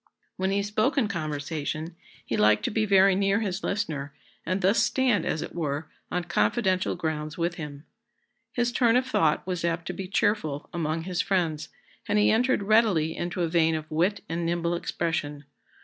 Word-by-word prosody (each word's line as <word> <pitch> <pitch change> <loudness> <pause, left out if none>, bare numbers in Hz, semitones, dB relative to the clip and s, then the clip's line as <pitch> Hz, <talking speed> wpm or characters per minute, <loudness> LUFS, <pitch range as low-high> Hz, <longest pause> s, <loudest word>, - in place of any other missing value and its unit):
When 190 0 -1
he 200 +1 +1
spoke 215 +7 0
in 245 -6 +3
conversation, 155 -1 -4 0.3
he 115 - -2
liked 105 0 +3
to - - 0
be 215 0 0
very 195 -1 +6
near 195 +3 +2
his 195 -2 -3
listener, 150 -9 -3 0.3
and 185 +3 0
thus 195 +4 +4
stand, 240 -5 +2
as 155 - -1
it - - -8
were, 150 -2 -3 0.2
on 180 0 -1
confidential 185 - +1
grounds 155 -2 -3
with 170 0 0
him. 150 -2 -7 0.7
His 240 -1 0
turn 240 -1 +3
of 255 +1 +3
thought 200 -11 +1
was 180 -2 -3
apt 170 0 -1
to - - -4
be 190 -1 -6
cheerful 185 -7 0
among 160 -1 -2
his 180 +1 -1
friends, 165 -6 -1 0.4
and 210 - +1
he 210 - +4
entered 245 0 +2
readily 195 -7 +3
into 175 +1 -2
a - - +1
vein 165 -1 +2
of 155 0 -6
wit 180 +6 +1
and 170 +1 -2
nimble 170 0 0
expression. 165 -4 -2
175 Hz, 180 wpm, -26 LUFS, 155-200 Hz, 0.7 s, very